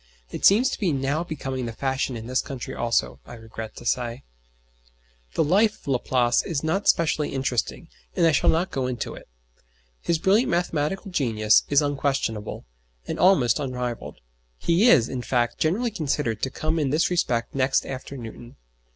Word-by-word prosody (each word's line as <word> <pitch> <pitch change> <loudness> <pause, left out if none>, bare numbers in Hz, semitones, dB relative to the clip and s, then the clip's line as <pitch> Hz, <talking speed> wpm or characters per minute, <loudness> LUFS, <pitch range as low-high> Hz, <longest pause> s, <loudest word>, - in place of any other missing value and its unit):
It - - -6
seems 225 +7 +5
to - - -4
be 190 -7 +1
now 140 +3 -1
becoming 135 -6 -4
the 115 - -5
fashion 135 0 -2
in 110 - -8
this 130 +2 0
country 135 -4 -7
also, 70 - 0
I 120 - -11
regret 110 -1 -8
to - - -11
say. 120 +1 -1 1.1
The - - +3
life 205 +8 +3
of - - -20
Laplace 125 -2 +2
is 160 -4 -3
not 180 +6 -1
specially 155 -2 +2
interesting, 130 +5 -2 0.3
and 175 - +3
I 165 - +5
shall 145 - +3
not 175 +4 +1
go 130 -2 -1
into 125 -3 -4
it. - - -12 0.7
His 170 - +1
brilliant 200 +9 +3
mathematical 175 +3 -1
genius 110 -9 +3
is 145 +1 +4
unquestionable, 135 -7 -2 0.4
and - - -4
almost 145 - +4
unrivalled. 125 -4 -4 0.4
He 180 - +3
is, 120 - +5
in 130 -1 -4
fact, 120 -1 0
generally 215 +10 +1
considered 145 - -2
to 130 - 0
come 155 +4 -2
in 145 -3 0
this 155 +6 +1
respect 120 -9 0
next 135 0 +1
after 135 +1 -7
Newton. 120 0 -10
135 Hz, 170 wpm, -24 LUFS, 120-165 Hz, 1.1 s, seems